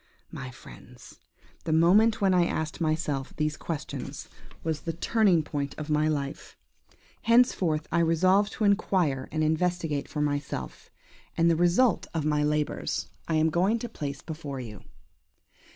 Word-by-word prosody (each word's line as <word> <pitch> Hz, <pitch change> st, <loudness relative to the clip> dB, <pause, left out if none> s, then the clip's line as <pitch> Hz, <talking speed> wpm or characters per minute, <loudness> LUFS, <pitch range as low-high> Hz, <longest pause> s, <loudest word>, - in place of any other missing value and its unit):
My 130 Hz, -, -6 dB
friends! 125 Hz, -1 st, -14 dB, 0.4 s
the 160 Hz, -, -2 dB
moment 200 Hz, +8 st, +4 dB
when 195 Hz, -2 st, +3 dB
I 175 Hz, -1 st, +4 dB
asked 160 Hz, +1 st, -3 dB
myself 155 Hz, -4 st, -1 dB
these 150 Hz, -1 st, -1 dB
questions 155 Hz, -2 st, -6 dB, 0.3 s
was 160 Hz, -2 st, -2 dB
the 165 Hz, -, -3 dB
turning 185 Hz, -1 st, +2 dB
point 145 Hz, -1 st, -4 dB
of 155 Hz, 0 st, -5 dB
my 150 Hz, +1 st, +2 dB
life. 145 Hz, -1 st, -4 dB, 0.6 s
Henceforth 195 Hz, -10 st, +3 dB
I 170 Hz, -, +2 dB
resolved 185 Hz, +5 st, +3 dB
to -, -, -3 dB
inquire 185 Hz, -9 st, +1 dB
and 155 Hz, +1 st, 0 dB
investigate 160 Hz, -2 st, 0 dB
for 150 Hz, -, -4 dB
myself, 145 Hz, -1 st, -3 dB, 0.5 s
and 170 Hz, 0 st, +4 dB
the -, -, +3 dB
result 175 Hz, +7 st, +3 dB
of 155 Hz, -2 st, -1 dB
my 150 Hz, -1 st, +2 dB
labours 150 Hz, 0 st, -1 dB, 0.2 s
I 165 Hz, -, 0 dB
am 155 Hz, +1 st, +3 dB
going 190 Hz, +7 st, +2 dB
to 240 Hz, -, -5 dB
place 145 Hz, -10 st, -6 dB
before 150 Hz, -4 st, -6 dB
you. 110 Hz, -4 st, -8 dB
160 Hz, 150 wpm, -27 LUFS, 150-180 Hz, 0.6 s, moment